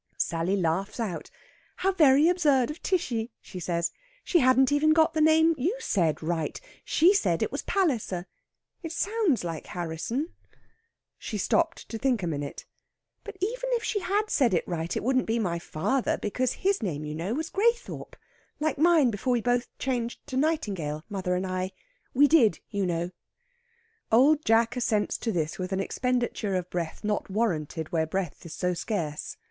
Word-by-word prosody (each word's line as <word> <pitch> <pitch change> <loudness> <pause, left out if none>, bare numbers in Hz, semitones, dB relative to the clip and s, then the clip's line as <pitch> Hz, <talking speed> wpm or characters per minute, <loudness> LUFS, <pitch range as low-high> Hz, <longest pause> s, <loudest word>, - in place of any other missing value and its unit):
Sally 170 +3 0
laughs 185 +5 -1
out. 195 -8 -3 0.5
"How 385 +1 +1
very 300 -4 +5
absurd 300 -8 +3
of 300 - -10
Tishy!" 245 -11 -1
she 185 - -9
says. 170 -1 -1 0.3
"She 350 - +3
hadn't 260 0 +4
even 305 +2 +4
got 320 +1 +4
the 310 - +1
name 320 +1 +5
you 355 - 0
said 165 - 0
right. 160 -1 -2 0.2
She 345 +6 +4
said 405 - +1
it - - -2
was - - -3
Palliser. 240 - 0 0.6
It 330 -3 -6
sounds 395 - +1
like 165 -2 -5
Harrisson." 180 - -3 0.9
She 215 - -4
stopped 330 - 0
to 225 - -6
think 250 -6 +1
a - - 0
minute. 145 -3 -4 0.6
"But - - -9
even - - -2
if 470 -1 0
she 420 - 0
had 410 +3 0
said 240 -9 +3
it 170 - -1
right 170 -1 -2
it - - -3
wouldn't 255 +1 +1
be 225 +1 +1
my 175 -7 -1
father, 200 +11 -1
because 250 +4 -1
his 390 -3 0
name, 155 -8 -3
you 150 - -4
know, 175 +9 -2
was 320 +2 -3
Graythorpe 470 +4 0 0.4
like 305 -1 -1
mine 320 -6 +5
before 235 +5 -1
we 240 - +1
both 245 +1 +1
changed 240 -3 -3
to 275 - -6
Nightingale 200 - -1
mother 185 -3 -1
and 185 +1 -1
I. 185 0 -3 0.4
We 290 +3 +6
did, 280 -9 +4
you 200 -2 0
know." 175 +1 -2 1.0
Old 285 +7 +5
Jack 225 +2 +3
assents 220 -4 0
to 230 - -1
this 160 -3 -2
with 185 +1 -3
an 190 - 0
expenditure 240 -2 -1
of 180 -1 -3
breath 170 +1 -4
not 210 -1 -1
warranted 165 -7 -1
where 160 -2 +1
breath 175 -1 -4
is 160 - -8
so 180 0 0
scarce. 170 -6 -3
230 Hz, 175 wpm, -27 LUFS, -, 1.0 s, We